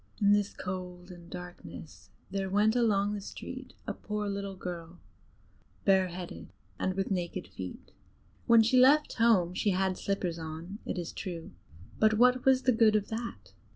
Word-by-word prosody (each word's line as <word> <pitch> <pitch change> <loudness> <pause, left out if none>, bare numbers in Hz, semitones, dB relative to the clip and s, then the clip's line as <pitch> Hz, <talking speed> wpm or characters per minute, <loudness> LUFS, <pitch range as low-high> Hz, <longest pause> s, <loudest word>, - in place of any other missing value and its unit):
In 205 -1 +5
this 205 -1 +2
cold 180 0 -6
and 175 -1 -12
darkness 95 - -10 0.2
there 195 -1 -2
went 210 +3 +3
along 205 -4 +2
the 205 - -4
street - - -8
a - - -2
poor 210 0 -4
little 200 -1 -3
girl, 175 -2 -7 0.9
bareheaded, 185 -2 0 0.3
and 185 - 0
with 195 +1 -2
naked 175 - -2
feet. 95 0 -8 0.6
When 230 -1 +7
she 250 +3 +4
left 285 +4 +5
home 215 -7 +4
she 205 - +1
had 190 -1 0
slippers 180 -4 -2
on, 165 +5 -7
it - - -2
is 175 -2 -4
true; 170 -3 -6 0.5
but 215 0 +5
what 250 +2 +4
was 265 -1 +5
the 255 - +4
good 220 -2 +4
of 210 -1 0
that? 220 - -6
195 Hz, 160 wpm, -30 LUFS, 175-215 Hz, 0.9 s, When